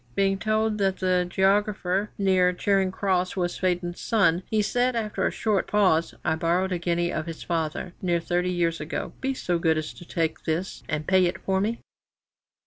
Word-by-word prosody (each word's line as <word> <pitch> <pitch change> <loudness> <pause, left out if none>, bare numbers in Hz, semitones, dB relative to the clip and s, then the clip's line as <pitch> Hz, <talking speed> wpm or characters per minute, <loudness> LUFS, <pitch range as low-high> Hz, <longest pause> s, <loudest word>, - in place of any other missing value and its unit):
Being 195 0 +2
told 215 0 0
that 195 -1 +1
the 180 -1 +1
geographer 195 +1 +1
near 185 -2 +3
Charing 190 0 +1
Cross 185 -2 0
was 175 -2 -2
Faden's 180 -1 -1
son, 190 -6 +2
he 215 -1 +2
said, 245 +3 +1
after 215 -2 -1
a - - -1
short 210 -4 0
pause: 185 -6 +2
"I 160 - +2
borrowed 175 +3 0
a 180 - -1
guinea 175 0 0
of 155 - -3
his 165 -1 -6
father 165 +1 -2
near 175 -2 +1
thirty 175 +1 -1
years 170 -2 0
ago; 150 +2 -4
be 265 0 -1
so 175 -8 -1
good 160 -1 +2
as 155 0 -4
to - - -12
take 165 -2 -2
this, 165 +4 -2
and 150 0 -2
pay 185 +1 +4
it 175 - -3
for 190 0 +1
me."' 225 +3 -1
185 Hz, 190 wpm, -26 LUFS, 170-200 Hz, -, pay